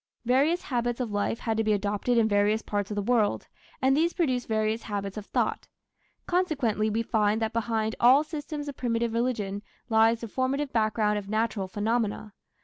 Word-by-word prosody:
Various 280 +8 +2
habits 240 -2 -1
of 240 -4 -2
life 205 +2 -1
had 225 -2 -1
to 225 - +2
be 215 -1 +2
adopted 205 +4 0
in 225 -1 +4
various 205 +1 +2
parts 205 -1 -2
of 210 - -4
the 205 - -1
world, 225 -2 +1 0.4
and 265 +1 +4
these 335 +3 +2
produced 255 -8 0
various 220 0 0
habits 200 -2 -4
of 210 -1 -7
thought. - - -1 0.6
Consequently, 275 - 0
we 225 +2 0
find 215 -1 +1
that 220 0 -2
behind 225 -1 -1
all 260 +5 +6
systems 300 -1 -6
of 285 - -5
primitive 235 -2 -1
religion 220 -5 -1 0.3
lies 225 +1 +4
the 230 - -5
formative 270 +4 -1
background 215 -1 +1
of 200 -1 -10
natural 215 -2 -1
phenomena. 210 +1 -2
225 Hz, 180 wpm, -27 LUFS, 210-250 Hz, 0.6 s, all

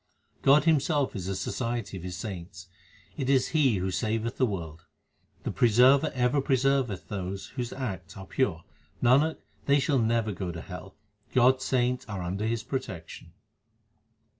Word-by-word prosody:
God 140 +2 +6
Himself 150 -4 +2
is 95 -3 -4
the 95 - -2
society 115 0 -3
of 95 - -6
His 90 0 -6
saints: 90 -1 -7 0.5
it 135 -3 -2
is 135 -2 +3
He 140 -8 +3
who 95 +1 -1
saveth 115 +4 -1
the 130 - +3
world. 80 -6 -6 0.6
The - - -2
Preserver 130 +6 +5
ever 125 +2 +2
preserveth 130 -9 +1
those 95 0 -5
whose 125 -2 -4
acts 100 -11 -5
are 95 - -8
pure; 90 -9 -1 0.4
Nanak, 140 +6 +4 0.3
they 140 0 +5
shall 140 -1 +2
never 115 -1 +1
go 90 -1 -4
to 85 -1 -7
hell; 90 +2 -9 0.4
God 130 +1 +6
s 130 - -6
saints 125 -1 +1
are 100 -4 -4
under 95 +5 -2
His 115 0 -1
protection. 90 - -6
115 Hz, 160 wpm, -28 LUFS, 95-130 Hz, 0.6 s, God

